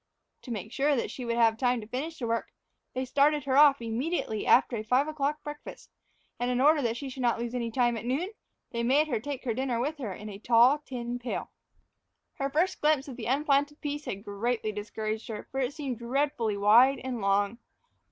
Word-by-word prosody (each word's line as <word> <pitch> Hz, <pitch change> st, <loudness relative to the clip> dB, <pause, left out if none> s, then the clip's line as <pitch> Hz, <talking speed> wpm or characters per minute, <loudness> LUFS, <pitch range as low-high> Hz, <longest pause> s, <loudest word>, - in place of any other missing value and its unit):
To 250 Hz, -, -9 dB
make 215 Hz, -1 st, -5 dB
sure 285 Hz, +1 st, +2 dB
that 240 Hz, -, -2 dB
she 250 Hz, -, -6 dB
would 235 Hz, 0 st, -1 dB
have 225 Hz, -1 st, +3 dB
time 250 Hz, -1 st, +2 dB
to 215 Hz, -, -8 dB
finish 280 Hz, +9 st, -4 dB
the 250 Hz, -, -4 dB
work, 230 Hz, 0 st, -2 dB, 0.4 s
they 255 Hz, -, -1 dB
had 260 Hz, -, -4 dB
started 290 Hz, +2 st, +3 dB
her 265 Hz, -1 st, 0 dB
off 280 Hz, -3 st, +6 dB
immediately 230 Hz, 0 st, -2 dB
after 250 Hz, 0 st, +5 dB
a 215 Hz, -, -3 dB
five 255 Hz, +6 st, +2 dB
o'clock 300 Hz, 0 st, -2 dB
breakfast; 295 Hz, 0 st, -9 dB, 0.5 s
and 245 Hz, 0 st, 0 dB
in 250 Hz, 0 st, 0 dB
order 295 Hz, +3 st, +5 dB
that 235 Hz, -2 st, -1 dB
she 275 Hz, -, -5 dB
should 260 Hz, 0 st, -7 dB
not 240 Hz, -2 st, +2 dB
lose 235 Hz, 0 st, -4 dB
any 235 Hz, -2 st, -2 dB
time 240 Hz, 0 st, +1 dB
at 220 Hz, -, -5 dB
noon, 295 Hz, -, -1 dB, 0.4 s
they 235 Hz, -, -3 dB
had 235 Hz, -, 0 dB
made 290 Hz, +4 st, +4 dB
her 235 Hz, -5 st, 0 dB
take 280 Hz, +3 st, -5 dB
her 240 Hz, -4 st, -1 dB
dinner 255 Hz, -1 st, -1 dB
with 295 Hz, +5 st, -2 dB
her 230 Hz, -7 st, -4 dB
in 210 Hz, +3 st, -8 dB
a 200 Hz, -1 st, -8 dB
tall 240 Hz, +6 st, +5 dB
tin 245 Hz, -4 st, -5 dB
pail. 245 Hz, 0 st, -4 dB, 0.9 s
Her 275 Hz, 0 st, 0 dB
first 330 Hz, +7 st, 0 dB
glimpse 300 Hz, -2 st, +2 dB
of 265 Hz, -, -7 dB
the 235 Hz, -3 st, -6 dB
unplanted 285 Hz, +2 st, +1 dB
piece 295 Hz, 0 st, -4 dB
had 200 Hz, 0 st, -5 dB
greatly 215 Hz, +2 st, -2 dB
discouraged 215 Hz, +1 st, -4 dB
her, 215 Hz, -2 st, -6 dB
for 270 Hz, -, -3 dB
it 255 Hz, 0 st, 0 dB
seemed 275 Hz, -7 st, -4 dB
dreadfully 240 Hz, -3 st, 0 dB
wide 235 Hz, +7 st, +6 dB
and 250 Hz, -3 st, -4 dB
long. 200 Hz, +3 st, +1 dB
250 Hz, 220 wpm, -28 LUFS, 230-285 Hz, 0.9 s, off